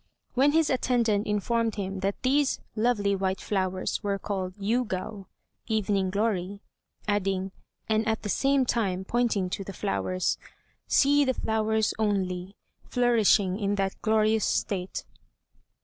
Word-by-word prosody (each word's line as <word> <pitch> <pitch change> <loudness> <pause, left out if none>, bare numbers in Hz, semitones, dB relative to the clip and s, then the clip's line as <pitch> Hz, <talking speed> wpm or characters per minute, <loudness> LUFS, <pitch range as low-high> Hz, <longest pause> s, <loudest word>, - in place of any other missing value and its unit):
When 275 +4 +4
his 320 -2 +3
attendant 235 -5 +1
informed 225 +2 0
him 195 -1 -4
that 195 +1 -1
these 275 +2 +2 0.2
lovely 215 -3 +2
white 190 0 -1
flowers 185 -2 -1
were 200 -2 -1
called 190 -2 -4
"Yûgao" 205 -2 -2 0.4
(evening 205 -4 +1
glory), 200 -1 -1 0.4
adding, 195 -2 0 0.4
and 220 0 +1
at 220 0 0
the - - -3
same 275 +5 +2
time 190 -6 0
pointing 230 -4 +1
to 195 - -3
the 195 - -7
flowers, 170 - -1 0.5
"See 285 +1 +4
the 260 -2 0
flowers 220 0 0
only, 190 -3 -1 0.3
flourishing 220 -5 +3
in 205 -1 0
that 195 -1 0
glorious 220 0 +2
state." 185 -2 -1
205 Hz, 130 wpm, -27 LUFS, 195-230 Hz, 0.5 s, When